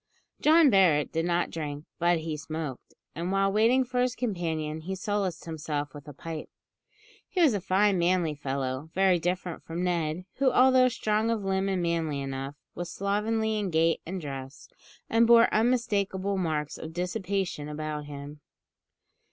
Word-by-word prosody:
John 310 -2 +6
Barret 170 -7 +4
did 165 +1 -1
not 175 0 0
drink, 150 -2 -5
but 170 -1 +2
he 155 -1 -3
smoked; 150 -3 -6 0.2
and, 170 +3 -3
while 195 0 +2
waiting 230 +5 +4
for 250 0 -1
his 250 0 +1
companion, 160 -8 -2
he 190 +4 -4
solaced 195 -3 -2
himself 150 -3 -4
with 145 0 -11
a - - -7
pipe. 160 +2 -7 0.8
He 375 - -3
was 315 -8 +5
a 200 - -1
fine 195 +1 +2
manly 170 -2 +2
fellow, 135 0 -3
very 190 -2 +4
different 175 0 -2
from 170 +2 -4
Ned; 170 -1 -1
who, 265 -1 +3
although 255 0 +5
strong 220 -2 0
of 225 -3 -1
limb 190 0 0
and 185 -2 0
manly 165 -4 -1
enough, 135 +1 -4 0.2
was 175 -1 -5
slovenly 215 +2 0
in 200 -2 -1
gait 165 0 +2
and 185 +3 -5
dress, 135 -3 -7 0.4
and 230 +1 +4
bore 235 0 +6
unmistakable 200 -4 +1
marks 155 -5 -2
of 160 0 -7
dissipation 180 -3 -2
about 150 0 -4
him. 145 0 -9
175 Hz, 160 wpm, -28 LUFS, 155-205 Hz, 0.8 s, John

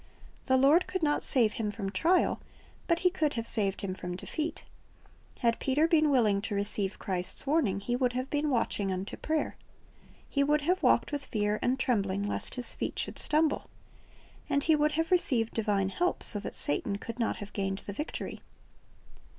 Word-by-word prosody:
The 260 - +4
Lord 290 +7 +5
could 375 -3 -3
not 295 -1 +1
save 230 -5 +3
him 220 -2 -2
from 200 -2 -4
trial, 350 - +2 0.5
but 335 -1 +1
He 365 - +3
could 305 -4 0
have 230 -1 -3
saved 200 -5 -1
him 190 -2 -3
from 180 -1 -5
defeat. 310 - -4 0.8
Had 230 -1 +2
Peter 290 +4 +2
been 310 -3 +3
willing 215 -7 +3
to 205 0 -3
receive 200 -1 -1
Christ's 185 +3 +2
warning, 270 -10 +1
he 240 +5 -2
would 250 -1 +1
have 255 +1 -2
been 295 0 0
watching 215 -6 0
unto 185 +1 -4
prayer. 310 0 -2 0.7
He 280 - +1
would 300 +1 +2
have 360 +6 +1
walked - - +3
with 285 -2 -3
fear 210 -2 0
and 255 +2 +1
trembling 200 -6 0
lest - - -1
his 250 -2 -3
feet - - -4
should - - -2
stumble. 305 0 +1 0.8
And 280 0 +1
he 320 - +4
would 300 0 +2
have 325 +2 -1
received 250 -11 +2
divine 205 -3 0
help, 355 - -1
so 205 - +2
that 200 - -6
Satan 200 +7 -1
could 230 +3 -8
not 230 - 0
have 205 -1 -9
gained 195 -1 -2
the 200 - -5
victory. 300 +10 -5
245 Hz, 185 wpm, -29 LUFS, 200-300 Hz, 0.8 s, Lord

